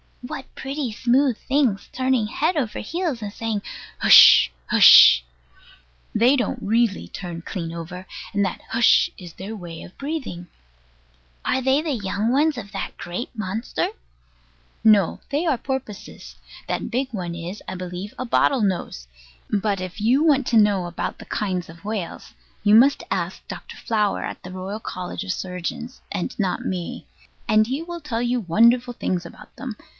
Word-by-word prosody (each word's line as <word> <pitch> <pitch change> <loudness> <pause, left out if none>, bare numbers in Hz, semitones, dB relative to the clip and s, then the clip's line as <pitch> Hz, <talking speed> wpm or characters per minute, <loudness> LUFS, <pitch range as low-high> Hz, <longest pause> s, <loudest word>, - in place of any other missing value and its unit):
What 260 +1 -6
pretty 270 -2 -4
smooth 250 +2 +2
things, 265 -8 0
turning 255 -4 +1
head 315 +10 0
over 255 -8 -2
heels, 325 - -3
and 205 -1 -5
saying, 225 -3 -3 0.4
"Hush, - - +8 0.2
Hush!" - - +8 0.9
They 245 +5 +4
don't 245 -6 -1
really 225 -1 +1
turn 175 -3 -7
clean 165 -2 -5
over; 180 +3 -8 0.3
and 200 0 +2
that 190 - -4
"Hush" 230 -1 +4
is 175 -3 -10
their 200 +4 -7
way 170 -5 -8
of 180 - -14
breathing. 275 - -5 1.0
Are 260 - 0
they 265 +3 +2
the 315 -1 -3
young 210 0 -1
ones 295 +2 +2
of 200 -4 -7
that - - -5
great 180 +8 -5
monster? 215 +2 -2 0.9
No; 210 -5 +4
they 295 +5 -1
are 300 -6 +2
porpoises. 225 - -6 0.3
That - - -3
big 260 +2 -1
one 175 -4 -4
is, 175 +4 -7
I 185 - -5
believe, 180 +2 -6
a 255 - -3
bottle 255 +1 +2
nose. 180 - -2 0.4
But 200 -2 0
if 185 +2 -6
you 245 +8 +3
want 285 -5 +3
to 230 - +3
know 205 -4 +3
about 175 -1 -4
the - - -10
kinds 185 -5 -3
of 170 +4 -14
whales, 210 -5 -5 0.3
you 205 0 +4
must 265 +6 +5
ask 185 -1 -3
Dr. - - -8
Flower 210 -3 0
at - - -6
the 180 - -8
Royal 190 +3 -5
College 180 -2 -5
of 195 - -3
Surgeons, 185 +8 -5
and 195 -4 -4
not 190 -3 -1
me: 180 -2 -4 0.4
and 215 0 +4
he 270 +6 -3
will 345 0 -7
tell 235 -6 -3
you 245 +1 0
wonderful 235 +6 +3
things 180 -6 -2
about 170 - -13
them. 255 -5 -6
215 Hz, 165 wpm, -23 LUFS, 185-255 Hz, 1.0 s, Hush